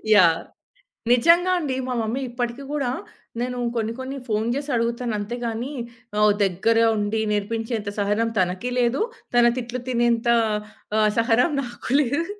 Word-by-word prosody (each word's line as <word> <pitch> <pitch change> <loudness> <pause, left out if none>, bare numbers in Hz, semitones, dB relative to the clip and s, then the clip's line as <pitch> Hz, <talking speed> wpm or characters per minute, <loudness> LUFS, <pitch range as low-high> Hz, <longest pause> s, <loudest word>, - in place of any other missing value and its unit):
Yeah! 170 -4 +6 0.7
నిజంగా 340 +8 +5
అండి. 280 -6 -2
మా 250 - -1
మమ్మీ 230 +5 -2
ఇప్పటికి 245 +2 -3
గూడా, 280 -4 -1 0.5
నేను 250 0 -2 0.2
కొన్ని 225 -1 -1
కొన్ని 265 +1 -5
ఫోను 220 +1 0
జేసి 285 +1 -4
అడుగుతాను. 235 0 -1
అంతేగాని, 235 +4 -4 0.5
ఆహ్, 210 0 +5
దగ్గర 195 +5 +1 0.2
ఉండి 210 +1 0
నేర్పించేంత 220 +1 -2
సహనం 210 +3 +1
తనకి 185 +6 0
లేదు. 245 - +2 0.3
తన 240 0 +6
తిట్లు 245 +1 -4
తినేంత 235 -1 +1 0.7
ఆహ్, 215 -1 +4
సహనం 235 +6 +3
నాకు 240 -1 -8
లేదు. 285 +6 -1
235 Hz, 135 wpm, -23 LUFS, 220-250 Hz, 0.7 s, Yeah